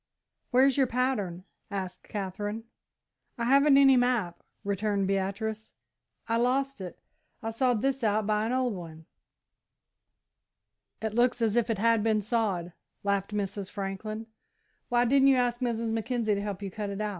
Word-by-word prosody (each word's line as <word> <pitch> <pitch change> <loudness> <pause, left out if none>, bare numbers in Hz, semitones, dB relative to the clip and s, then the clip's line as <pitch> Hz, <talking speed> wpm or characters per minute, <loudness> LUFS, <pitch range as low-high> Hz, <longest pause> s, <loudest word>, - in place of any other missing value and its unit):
"Where's 265 +1 +4
your 270 -2 +4
pattern," 230 -8 -1 0.3
asked 190 -2 -6
Katherine. 205 +2 -4 0.7
"I 235 - -2
haven't 275 +2 +5
any 270 -1 +7
map," 245 -8 +1 0.2
returned 200 0 0
Beatrice; 200 +3 -2 0.5
"I 230 0 +1
lost 265 +1 0
it. 180 -2 -7 0.5
I 225 - -2
sawed 240 -1 +1
this 270 -1 0
out 215 -1 +2
by 215 +1 +1
an - - -2
old 255 -2 +1
one." 160 -3 -9 2.0
"It 220 -1 -2
looks 245 +2 +2
as 225 -2 +1
if 235 -1 +2
it 225 - 0
had 230 +1 +3
been 220 0 +2
sawed," 200 -6 -1 0.3
laughed 200 0 0
Mrs. 200 -1 -3
Franklin. 205 +2 -5 0.6
"Why 240 0 +3
didn't 270 +2 +4
you 270 - +6
ask 245 -1 +1
Mrs. 230 -2 -1
Mackenzie 225 -1 0
to 200 - -1
help 205 -1 -5
you 195 - -4
cut 210 +1 -4
it?" 200 0 -5
220 Hz, 155 wpm, -28 LUFS, 200-245 Hz, 2.0 s, any